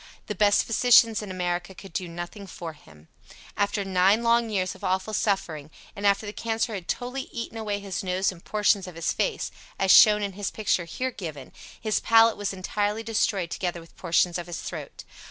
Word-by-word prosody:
The - - -3
best 205 +1 +4
physicians 230 -1 +5
in 210 - -7
America 180 0 -3
could 195 -1 -12
do 180 - -2
nothing 175 +4 -7
for 170 -3 -7
him. 80 - -19 0.5
After 200 0 0
nine 195 +4 +3
long 235 0 +3
years 190 -3 -1
of 190 - -16
awful 190 +3 -1
suffering, 165 -8 -1 0.3
and 205 0 0
after 200 +2 +2
the 205 - -6
cancer 225 0 -2
had 185 -4 -6
totally 255 +2 -3
eaten 230 -1 -6
away 210 -2 -2
his 200 -1 -4
nose 185 +1 0
and 175 -2 -14
portions 205 -2 +1
of 180 - -9
his 165 0 -1
face - - -1 0.3
(as 190 -1 +3
shown 210 -1 +8
in 200 -1 -3
his 205 +1 -3
picture 195 -5 0
here 255 +10 -3
given) 155 - -8 0.3
his 215 -1 0
palate 225 0 +5
was 205 -1 -3
entirely 205 +3 -2
destroyed 210 -5 0
together 175 -2 -3
with 165 0 -16
portions 175 0 +1
of 175 - -7
his 175 - -5
throat. - - -7
200 Hz, 195 wpm, -26 LUFS, 180-215 Hz, 0.5 s, shown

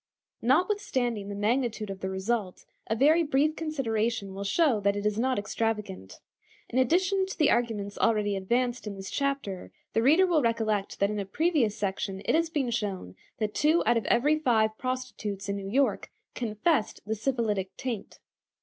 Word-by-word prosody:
Notwithstanding 255 - +1
the 200 - -4
magnitude 215 0 0
of 195 - -7
the 190 - -3
result, 190 0 -2 0.2
a 220 - 0
very 300 +8 +5
brief 300 0 +2
consideration 230 -10 -1
will 195 +1 -5
show 250 +2 +2
that 200 0 +1
it 205 0 -3
is 210 0 +1
not 255 +1 +1
extravagant. 205 - -3 0.5
In 255 - 0
addition 375 +8 +2
to 385 - -7
the 305 -2 +4
arguments 210 -4 -1
already 210 -3 +2
advanced 240 +5 -1
in 205 - -4
this 195 0 -7
chapter, 275 - -2 0.2
the 225 - +2
reader 310 +10 +5
will 340 -4 +2
recollect 220 -4 0
that 200 +1 +3
in 210 - -2
a 200 - -2
previous 260 - +1
section 195 -1 -3
it - - +2
has 330 +1 +2
been 280 -7 -1
shown 195 - -3 0.2
that 215 -1 -2
two 310 +3 +3
out - - +4
of 230 - 0
every 295 +6 +3
five 220 -6 +2
prostitutes 255 -6 -4
in 200 - -1
New 195 -1 -5
York 270 +6 +1 0.2
confessed 230 +3 0
the 215 - -1
syphilitic 215 -5 -1
taint. 235 -6 -5
225 Hz, 175 wpm, -28 LUFS, 205-270 Hz, 0.5 s, very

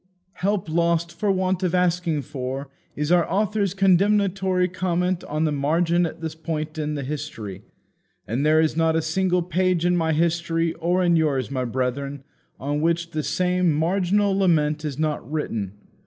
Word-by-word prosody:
"Help 200 -1 0
lost 170 +1 +1
for 205 +3 0
want 185 -1 0
of 185 -1 0
asking 175 -4 +1
for," 135 0 -5 0.3
is 150 +2 -1
our 175 -1 +3
author's 200 -1 0
condemnatory 190 -1 +3
comment 180 0 -1
on 155 +1 -2
the 155 - +1
margin 165 +4 +1
at 165 - -10
this 160 -1 -4
point 155 -1 -4
in 150 0 -2
the 140 - -3
history. 130 -9 -6 0.7
And 120 +6 -1
there 155 +1 +4
is 160 -1 +2
not 165 0 +2
a 160 - +2
single 180 +2 +1
page 180 0 +1
in 180 0 +3
my 165 -2 +1
history, 165 0 0
or 175 +2 +1
in 175 -1 +3
yours, 140 -5 0
my 130 -2 -1
brethren, 130 +3 -3 0.4
on 145 +2 -2
which 170 +1 0
the 155 - -1
same 180 +1 +1
marginal 190 +5 +1
lament 155 -5 +2
is 145 -3 -4
not 150 -4 -2
written. 110 -11 -3
165 Hz, 170 wpm, -23 LUFS, 150-180 Hz, 0.7 s, there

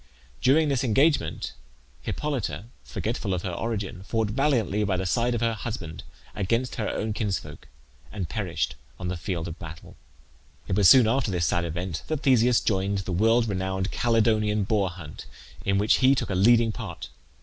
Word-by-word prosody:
During 150 +5 +4
this 135 -2 0
engagement 135 - +1 0.5
Hippolyte, 120 - -3 0.2
forgetful 110 -4 -3
of 85 - -4
her 95 - -2
origin, 100 -1 -3
fought 110 +1 -1
valiantly 115 -6 +1
by 95 -2 0
the 95 - -2
side 120 +5 +1
of 115 - -2
her 115 -1 +1
husband 105 -7 -6 0.3
against 115 +6 -1
her 110 - -1
own 110 0 -2
kinsfolk, 95 -8 -4 0.4
and 100 -5 -4
perished 85 - -2 0.3
on 90 -1 -3
the 90 - -2
field 85 0 -3
of 85 +2 -7
battle. 80 0 -10 0.7
It - - 0
was 100 -3 +6
soon 130 -3 +8
after 120 0 +1
this 90 -3 0
sad 85 +1 +1
event 85 +1 -4
that 155 -2 -3
Theseus 125 -2 +4
joined 100 -1 0
the 95 0 -5
world 115 +6 +3
renowned 95 0 -2
Calydonian 110 -3 +2
Boar 100 -1 +1
hunt, 85 -4 -10 0.4
in 100 0 +2
which 105 +2 +3
he 135 +1 +5
took 125 - -2
a - - 0
leading 115 +4 +4
part. - - -7
105 Hz, 170 wpm, -26 LUFS, 90-115 Hz, 0.7 s, soon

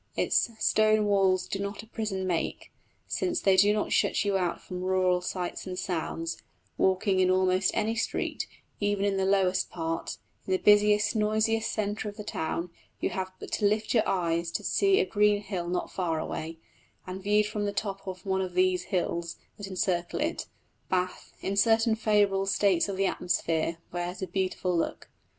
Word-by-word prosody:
Its - - +2
"stone 215 0 +3
walls 190 -2 +2
do 195 - -3
not 200 +1 -4
a - - -15
prison 210 -4 -3
make," 175 -3 -2 0.4
since 350 -2 -1
they 195 -1 +4
do 200 +2 +6
not 210 0 -1
shut - - +2
you 200 -1 +1
out 180 -2 0
from 180 -1 -7
rural 185 -1 +2
sights 180 +1 -4
and 180 -1 -5
sounds: 165 -2 -3 0.3
walking 190 0 +2
in 185 0 +4
almost 185 0 +3
any 220 +1 +1
street, - - -2 0.3
even 205 -1 0
in 200 -1 +1
the 190 - +1
lowest 190 -1 +2
part, 165 -1 -3 0.3
in 190 - +1
the - - +4
busiest, 210 +2 +4
noisiest 220 +1 +1
centre 210 0 -2
of 205 - -11
the 210 - -6
town, 170 -1 -3 0.3
you - - -1
have 185 0 -3
but - - -9
to 210 - 0
lift 215 +2 +1
your 225 - +5
eyes 170 -2 0
to - - -4
see 390 0 +3
a 430 - +3
green 210 - +3
hill 190 -4 -4
not 180 0 -2
far 170 -4 -1
away; 160 +1 -5 0.5
and 185 +1 -6
viewed 210 +2 +3
from 210 0 -2
the 205 - 0
top 195 -1 -4
of 185 +2 -7
one 190 -1 0
of 185 -2 -4
these 185 -1 +2
hills 170 -2 -2 0.2
that 205 -2 -6
encircle 185 -2 -1
it, 310 +3 -2 0.4
Bath, 185 0 -2
in 195 - -2
certain 225 +2 +4
favourable 205 -3 +2
states 195 -2 +2
of 195 - -3
the 195 - +2
atmosphere, 165 -3 0
wears 175 +2 -4
a - - -2
beautiful 185 0 -1
look. 165 - -2
190 Hz, 185 wpm, -28 LUFS, 180-210 Hz, 0.5 s, do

